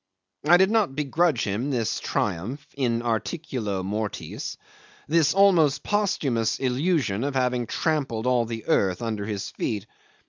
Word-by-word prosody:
I 175 +2 +8
did 190 +3 +4
not 215 -11 +2
begrudge 155 +3 +1
him 105 +7 -1
this 120 -5 -1
triumph 120 - -2
in 120 -4 0
articulo 115 - -2
mortis, 105 +2 -4 0.5
this 160 +1 +3
almost 165 -8 +4
posthumous 140 - 0
illusion 130 - 0
of 140 0 -2
having 125 -2 +1
trampled 140 -8 -1
all 125 -2 +2
the 115 -1 -6
earth 95 +1 +2
under 110 -3 -3
his 105 -3 -4
feet. 105 -3 -3
125 Hz, 135 wpm, -25 LUFS, 110-155 Hz, 0.5 s, I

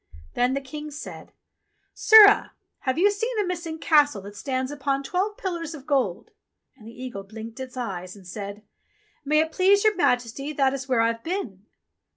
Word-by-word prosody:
Then 250 +2 +1
the 275 - -2
King 295 +3 -8
said, 300 +1 -9 0.6
"Sirrah! 425 -1 +7 0.3
Have 260 +1 -2
you 400 +4 +4
seen 450 +4 -3
a 415 - +1
missing 340 -3 -4
Castle 290 -10 +3
that 205 +1 -10
stands 260 +3 -3
upon 275 -1 -2
twelve 380 +8 -2
pillars 335 -4 -4
of 275 -3 -12
gold 270 - -1 0.2
?" - - -54
And 215 - -15
the 235 +2 -10
eagle 240 -6 -6
blinked 220 +4 -10
its 260 -1 -8
eyes 185 -6 -5
and 195 -2 -15
said, 200 +2 -7 0.6
"May 305 +2 +3
it 320 0 -2
please 390 +4 +4
your 430 -1 +4
Majesty 250 -2 0
that 270 -2 +2
is 270 0 -6
where 245 -3 +3
I've 230 0 0
been." 235 - -5
275 Hz, 185 wpm, -25 LUFS, 230-330 Hz, 0.6 s, Sirrah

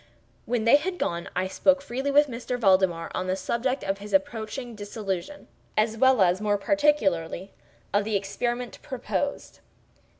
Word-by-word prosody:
When 240 -2 0
they 230 +5 +7
had 360 +4 -3
gone, 170 - -2
I 185 +1 +1
spoke 275 +8 +3
freely 270 0 -3
with 290 +1 +5
M. 245 0 -4
Valdemar 185 -5 +3
on 185 - -2
the 185 - +1
subject 235 +7 -1
of 195 0 -2
his 205 +1 -9
approaching 245 -3 -1
dissolution, 205 +3 -5 0.3
as 215 +1 +2
well 260 -2 +5
as, 180 +2 +2
more 205 -1 +1
particularly, 200 - +1 0.4
of 205 0 +3
the 215 0 -2
experiment 240 +5 -3
proposed. 280 +1 -4
220 Hz, 155 wpm, -26 LUFS, 195-265 Hz, 0.4 s, they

